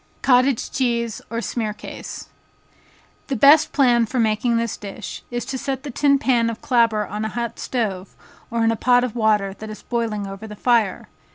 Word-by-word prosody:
Cottage 255 -1 +3
Cheese 235 -3 -1
or 230 +1 -3
Smearcase. 215 -3 -5 1.0
The 275 - -1
best 285 +6 +6
plan 245 -4 +4
of 230 - -2
making 230 0 +2
this 230 -1 -1
dish, 205 +1 -8
is 240 0 -3
to 265 - -4
set 270 -1 -3
the 290 - -6
tin 280 +3 +3
pan 245 -4 +2
of 230 - -5
clabber 230 -4 +2
on 210 +1 -5
a 220 - -2
hot 235 0 -4
stove, 200 -7 -3 0.3
or 230 0 0
in 225 - +3
a - - 0
pot 245 +2 +3
of 250 -3 -3
water 210 -4 +2
that 215 +2 -9
is 215 - -9
boiling 225 -4 -2
over 195 +2 -8
the 210 - -9
fire. 230 -3 +1
235 Hz, 185 wpm, -22 LUFS, 215-250 Hz, 1.0 s, best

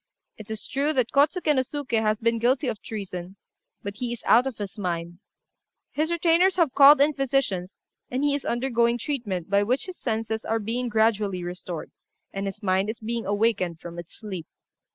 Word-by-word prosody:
It 215 -1 -12
is 220 -1 -5
true 285 +3 0
that 255 -5 +1
Kôtsuké 300 +3 +3
no 260 - +3
Suké 260 -3 -2
has 215 -1 +1
been 230 0 +1
guilty 255 +4 +2
of 220 -4 -3
treason, 190 -4 -6 0.5
but 200 0 -5
he 245 0 -3
is 240 - -6
out 245 +3 +5
of 260 - -5
his 205 +1 -6
mind; 175 -2 -3 0.7
his 310 +2 0
retainers 340 +2 +3
have 335 -7 +2
called 285 +1 +8
in 295 +2 +4
physicians, 265 -10 -1 0.3
and 255 +3 -1
he 290 -1 +3
is 285 - -2
undergoing 235 -1 +1
treatment 225 - -3
by 200 0 +3
which 245 +6 0
his 370 -1 -9
senses 220 -1 -2
are 225 - 0
being 235 +3 -2
gradually 210 -4 +1
restored, 175 -1 -6 0.4
and 195 0 -3
his 195 - -7
mind 190 +1 +1
is 225 - -4
being 230 -1 -3
awakened 200 -5 +1
from 170 0 -8
its 170 - -10
sleep. 190 -7 -7
225 Hz, 190 wpm, -25 LUFS, 200-270 Hz, 0.7 s, called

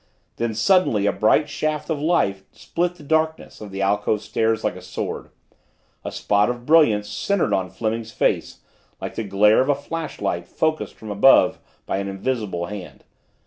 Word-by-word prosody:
Then 115 -2 -2
suddenly 115 - +3
a 100 - +3
bright 150 +7 +3
shaft 155 0 -2
of 150 -2 -2
light 150 - +1
split 175 +1 -2
the 155 - -14
darkness 160 -1 -1
of 105 - -7
the 95 0 -3
alcove 105 +1 +1
stairs 110 0 0
like 105 -4 -1
a 90 - -10
sword, 90 - -5 0.7
a - - -5
spot 105 +2 +1
of 120 0 -4
brilliance 125 -10 +4
centered 165 - 0
on 95 -1 0
Fleming's 110 +4 -3
face - - -1 0.4
like - - -5
the 115 - -3
glare 105 +3 +4
of 130 - -1
a 145 - +4
flashlight 155 +3 -4
focused 155 0 -1
from 110 -1 -8
above 105 +7 +5 0.3
by - - -2
an 100 - -3
invisible 100 -3 -2
hand. 100 -1 -9
110 Hz, 170 wpm, -22 LUFS, 100-150 Hz, 0.7 s, above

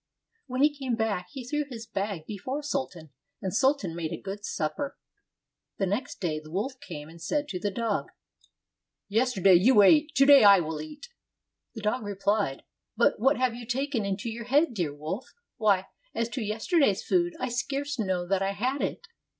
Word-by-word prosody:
When 255 +1 0
he 295 0 +4
came 265 -4 -2
back, 215 -5 -1
he 265 -4 -8
threw 295 +4 -1
his 235 -5 -8
bag 195 -6 -4
before 255 - -5
Sultan, 180 - -4 0.3
and 190 -3 -4
Sultan 255 - +1
made 165 -2 -3
a - - -4
good 200 +1 -7
supper. 275 - -3 0.8
The 195 - +1
next 210 +9 -3
day 160 -5 -1
the 155 0 -14
wolf 250 - -3
came 150 -4 -8
and 165 +1 -14
said 290 - -1
to 180 - -3
the 205 - -1
dog, 220 +1 -2 1.0
"Yesterday 210 -4 +3
you 205 +5 +6
ate, 300 +8 +5
to 275 - +6
day 280 -3 +8
I 200 -2 +8
will 160 -2 -3
eat." 295 - -10 0.7
The 220 - -6
dog 215 +4 0
re 205 -2 -5
phed, 200 -7 0 0.4
"But 235 - +3
what 270 +5 +3
have 255 -2 +1
you 235 -1 -9
taken 265 -1 -1
into 200 +2 -3
your 230 +1 -6
head, 285 +3 +3
dear 175 -9 -1
wolf? 155 - -6 0.2
Why, 200 -5 +3 0.3
as 230 0 -1
to 245 +1 -4
yesterday's 220 - +1
food, 350 -1 +1
I 255 - -2
scarce 275 +3 -3
know 185 -4 0
that 195 +1 +1
I 195 0 0
had 255 +7 -1
it." - - -3
220 Hz, 190 wpm, -28 LUFS, 190-265 Hz, 1.0 s, day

